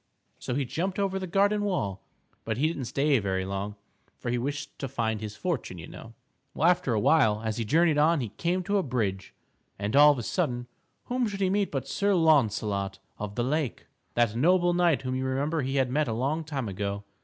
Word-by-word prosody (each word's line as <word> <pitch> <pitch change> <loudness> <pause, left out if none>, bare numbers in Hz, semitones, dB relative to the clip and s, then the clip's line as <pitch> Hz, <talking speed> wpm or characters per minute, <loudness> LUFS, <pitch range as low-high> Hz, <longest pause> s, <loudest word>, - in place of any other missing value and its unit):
So 125 - -3
he 140 0 0
jumped 180 +9 -2
over 195 -1 0
the 185 - -4
garden 200 +3 +2
wall, 105 - -1 0.4
but 110 -1 -2
he 140 - +2
didn't 150 -5 -3
stay 140 +2 +2
very 95 -2 -1
long, 100 +2 -4 0.4
for 120 - -3
he 120 - +1
wished 145 +3 -4
to 135 - -3
find 110 -4 -2
his 105 -1 -6
fortune, 135 - -3
you 80 - -8
know. 115 0 -11 0.4
Well, 160 - +3
after 175 -9 +2
a - - +2
while, 110 -4 +3
as 110 -1 -2
he 115 - -2
journeyed 160 +4 +3
on 160 +2 +4
he 120 -5 -3
came 175 - -1
to 200 +3 +1
a - - +3
bridge, 110 - -2 0.4
and, 100 +4 -2
all 150 +1 +8
of 145 - -1
a 120 - -4
sudden, 125 - -1 0.4
whom 250 -1 -1
should 200 -2 -5
he 190 -1 +2
meet 200 0 +1
but 135 -2 -3
Sir 200 0 +1
Launcelot 105 - +2 0.2
of 105 -1 -5
the 120 - 0
Lake, 145 0 -1 0.3
that 120 -2 +2
noble 175 +6 +3
knight 175 -5 +2
whom 130 0 -2
you 130 0 -1
remember 140 +4 0
he 135 +1 -2
had 130 -2 +1
met 150 +3 +1
a 115 - -1
long 140 +8 -1
time 140 -6 -4
ago. 100 +1 -3
135 Hz, 220 wpm, -28 LUFS, 110-170 Hz, 0.4 s, all